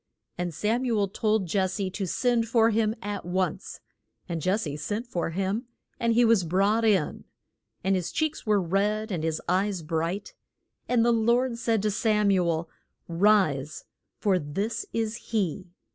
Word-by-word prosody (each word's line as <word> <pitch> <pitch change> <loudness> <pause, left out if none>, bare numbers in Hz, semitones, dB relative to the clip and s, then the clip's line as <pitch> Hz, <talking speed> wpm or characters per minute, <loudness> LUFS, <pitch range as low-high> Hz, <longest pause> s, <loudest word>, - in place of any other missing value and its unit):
And 175 0 -3
Sam 215 - 0
u 240 -4 +1
el 200 -2 +1
told 215 0 0
Jes 190 +1 0
se 195 -2 -2
to 195 0 -3
send 235 +3 +1
for 230 0 +4
him 220 0 +1
at 205 -1 -4
once. 185 +2 -2 0.5
And 165 -4 -4
Jes 200 +4 +1
se 145 -2 -4
sent 205 - -3
for 175 -9 -2
him, 195 +7 -2 0.3
and 235 -1 +2
he 240 +1 +5
was 225 -5 +4
brought 195 +6 +2
in, 200 -8 +1 0.6
and 190 +1 +2
his 180 -2 -2
cheeks 315 0 -1
were 210 -3 +3
red, 205 +4 0
and 170 -4 -2
his 160 -1 -1
eyes 185 0 0
bright. 165 +5 -2 0.6
And 235 -2 +3
the 240 - +4
Lord 235 +2 +2
said 225 -3 +1
to 210 - +1
Sam 210 -1 +2
u 180 -3 +2
el, 165 0 -1 0.4
Rise 165 -6 +2 0.3
for 195 -4 +2
this 195 +9 -3
is 225 0 -2
he. 190 -4 -2
200 Hz, 175 wpm, -27 LUFS, 180-225 Hz, 0.6 s, he